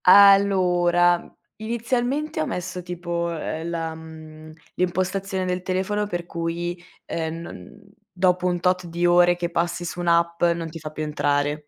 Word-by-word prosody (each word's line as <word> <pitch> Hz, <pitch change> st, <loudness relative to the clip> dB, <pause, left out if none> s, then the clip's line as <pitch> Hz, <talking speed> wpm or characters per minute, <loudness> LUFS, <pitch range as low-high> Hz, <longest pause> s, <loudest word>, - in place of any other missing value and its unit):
Allora, 180 Hz, -3 st, +5 dB, 0.3 s
inizialmente 240 Hz, -, -1 dB
ho 155 Hz, -, -1 dB
messo 180 Hz, 0 st, -4 dB
tipo, 175 Hz, -1 st, -3 dB
uhm, 165 Hz, 0 st, -4 dB
la 165 Hz, -1 st, -3 dB
mhmm, 155 Hz, -1 st, -11 dB, 0.2 s
l'impostazione 185 Hz, +1 st, -1 dB
del 180 Hz, 0 st, -1 dB
telefono 190 Hz, +3 st, -1 dB
per 175 Hz, -3 st, -4 dB
cui, 170 Hz, +1 st, -3 dB, 0.2 s
uhm, 160 Hz, -1 st, -3 dB
non 210 Hz, +5 st, -10 dB, 0.3 s
dopo 180 Hz, 0 st, +2 dB
un 175 Hz, -1 st, 0 dB
tot 180 Hz, 0 st, +1 dB
di 170 Hz, +1 st, -1 dB
ore 175 Hz, 0 st, +5 dB
che 170 Hz, -1 st, -3 dB
passi 170 Hz, +1 st, -1 dB
su 175 Hz, -, -5 dB
un'app, 170 Hz, -1 st, +1 dB
non 170 Hz, -1 st, +1 dB
ti 165 Hz, +1 st, -8 dB
fa 155 Hz, 0 st, -6 dB
più 155 Hz, 0 st, -5 dB
entrare. 145 Hz, 0 st, -1 dB
175 Hz, 150 wpm, -23 LUFS, 165-185 Hz, 0.3 s, Allora